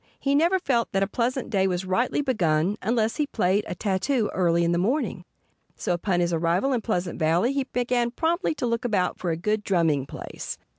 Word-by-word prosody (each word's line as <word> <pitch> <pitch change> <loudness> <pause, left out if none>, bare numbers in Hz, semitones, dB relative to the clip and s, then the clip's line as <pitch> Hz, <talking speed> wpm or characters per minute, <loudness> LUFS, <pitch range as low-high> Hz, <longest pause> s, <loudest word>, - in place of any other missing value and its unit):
He 275 - 0
never 335 +6 +3
felt 250 -9 0
that 195 0 +2
a - - 0
pleasant 245 +4 -2
day 195 -3 +2
was 180 0 -2
rightly 235 +10 0
begun 180 - +1
unless 225 -1 0
he 300 - 0
played 205 -4 +1
a - - -4
tattoo 210 +5 0
early 170 -2 +2
in 170 - +2
the 170 - +1
morning. 250 - -1 0.5
So - - -1
upon 175 +1 0
his 175 0 0
arrival 170 +11 +1
in 240 - 0
Pleasant 180 -6 -2
Valley 170 +11 +2
he 275 -1 -1
began 245 -1 0
promptly 325 +6 0
to 265 - -2
look 230 0 -1
about 200 -7 0
for 180 - -2
a 165 - -1
good 210 +5 -1
drumming 160 -8 +1
place. - - -7
210 Hz, 205 wpm, -25 LUFS, 175-250 Hz, 0.5 s, never